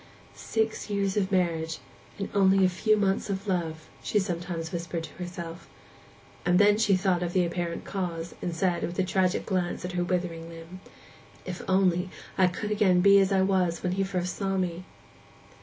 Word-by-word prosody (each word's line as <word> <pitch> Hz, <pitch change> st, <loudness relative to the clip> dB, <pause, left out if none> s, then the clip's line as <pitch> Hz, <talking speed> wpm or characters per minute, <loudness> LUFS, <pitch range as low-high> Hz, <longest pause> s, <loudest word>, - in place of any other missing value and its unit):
'Six 220 Hz, -1 st, -2 dB
years 200 Hz, -2 st, 0 dB
of 195 Hz, -2 st, 0 dB
marriage, 165 Hz, -4 st, 0 dB, 0.4 s
and 195 Hz, -, -3 dB
only 195 Hz, -1 st, +5 dB
a -, -, +4 dB
few 215 Hz, +4 st, +2 dB
months 200 Hz, 0 st, 0 dB
of 195 Hz, +1 st, -3 dB
love,' 165 Hz, -4 st, -2 dB
she -, -, 0 dB
sometimes 175 Hz, -4 st, -2 dB
whispered 170 Hz, -1 st, -3 dB
to 155 Hz, -, -9 dB
herself. 175 Hz, -1 st, -7 dB, 0.7 s
And 175 Hz, 0 st, +3 dB
then 205 Hz, +1 st, +5 dB
she 205 Hz, -3 st, +4 dB
thought 185 Hz, -2 st, +1 dB
of 175 Hz, -1 st, -2 dB
the 180 Hz, -2 st, +3 dB
apparent 170 Hz, 0 st, -3 dB
cause, 175 Hz, -4 st, -4 dB
and 175 Hz, -2 st, -3 dB
said, 175 Hz, 0 st, +1 dB
with 175 Hz, -, -3 dB
a 190 Hz, -, +3 dB
tragic 185 Hz, 0 st, +1 dB
glance 180 Hz, -3 st, -1 dB
at 180 Hz, -, -4 dB
her 180 Hz, 0 st, 0 dB
withering 175 Hz, -2 st, -2 dB
limb, 165 Hz, +2 st, -10 dB, 0.7 s
'If 180 Hz, -1 st, -4 dB
I -, -, -10 dB
could -, -, -6 dB
only 185 Hz, -1 st, +2 dB, 0.3 s
again 190 Hz, 0 st, +3 dB
be 200 Hz, +1 st, +7 dB
as 195 Hz, 0 st, +2 dB
I 190 Hz, -1 st, +4 dB
was 185 Hz, -3 st, +1 dB
when 180 Hz, -, 0 dB
he 195 Hz, +1 st, 0 dB
first 180 Hz, -2 st, -2 dB
saw 195 Hz, -1 st, -1 dB
me! 180 Hz, -1 st, -2 dB
185 Hz, 185 wpm, -27 LUFS, 175-195 Hz, 0.7 s, be